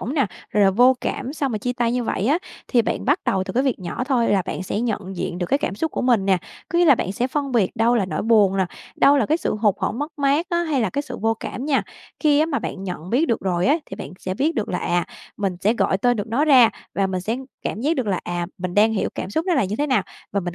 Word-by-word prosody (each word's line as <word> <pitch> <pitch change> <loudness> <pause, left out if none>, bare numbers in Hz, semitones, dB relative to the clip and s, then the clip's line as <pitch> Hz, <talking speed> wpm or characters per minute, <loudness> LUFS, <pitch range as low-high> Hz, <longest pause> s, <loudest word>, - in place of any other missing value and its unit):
rỗng 260 - -4
nè, 275 -6 +2 0.2
rồi 210 -1 +3
là 195 - +5
vô 245 +6 +5
cảm 265 +1 -3
sau 290 -2 -1
mà 225 -4 -2
chia 245 +4 -2
tay 240 -1 0
như 245 -1 -1
vậy 205 - -1
á, 295 +6 +3 0.3
thì 240 -3 +3
bạn - - -2
bắt 290 +7 +2
đầu 190 -1 +1
từ - - -5
cái 255 +3 +2
việc 265 -4 0
nhỏ 185 +6 -4
thôi 250 -4 +1
là 195 -2 +3
bạn 185 - -4
sẽ 195 +3 -2
nhận 205 -5 -3
diện 175 0 -3
được 175 - -2
cái 275 - +2
cảm 195 - -2
xúc 320 +10 -2
của - - -3
mình 240 -6 +3
nè. 190 -2 +3 0.3
Có 340 - 0
nghĩa 350 - +5
là 290 -5 +7
bạn 190 -5 -3
sẽ 240 +5 0
phân 275 0 -2
biệt 215 -7 +2
đâu 230 +2 +3
là 215 - +2
nỗi 185 - -3
buồn 210 -4 +4
nè, 190 - +2 0.3
đâu 285 +1 +5
là 230 - +2
cái 315 - +2
sự - - -1
hụt 210 -2 +2
hẫng 225 - -1
mất 295 +2 -5
mát 285 +4 +2
á 345 0 +1
hay 305 -5 0
là 220 -5 0
cái 285 - -2
sự 255 -3 -7
vô 225 +1 +1
cảm 250 - -5
nha. 285 -2 +2 0.4
Khi 295 -2 +4
á 310 - +3
mà 290 -4 -1
bạn 190 - -5
nhận 180 -1 -6
biết 285 +8 +2
được 230 - +1
rồi 180 -2 0
á, 290 - +4
thì - - -8
bạn - - -7
sẽ 185 - -4
biết 300 - 0
được 220 - -2
là 180 - -1
à, 175 0 0 0.3
mình 195 -4 -2
sẽ 205 +4 +3
gọi 195 - +1
tên 245 +3 +2
được 205 - -3
nó 240 +7 +1
ra 260 -7 +7 0.2
và 195 -1 +1
mình 185 -1 -2
sẽ 220 +6 -2 0.3
cảm 215 - -3
giác 305 +6 +1
được 250 -4 -1
là, 190 -3 0
à, 175 0 -2
mình 180 -1 -4
đang 215 +2 +4
hiểu 215 - 0
cảm - - -5
xúc 320 - -1
nó 360 - +2
là 270 - +2
như 200 +3 -3
thế 295 - 0
nào, 255 -8 +2 0.3
và 200 - +1
mình 175 -2 -5
230 Hz, 305 wpm, -22 LUFS, 195-275 Hz, 0.4 s, là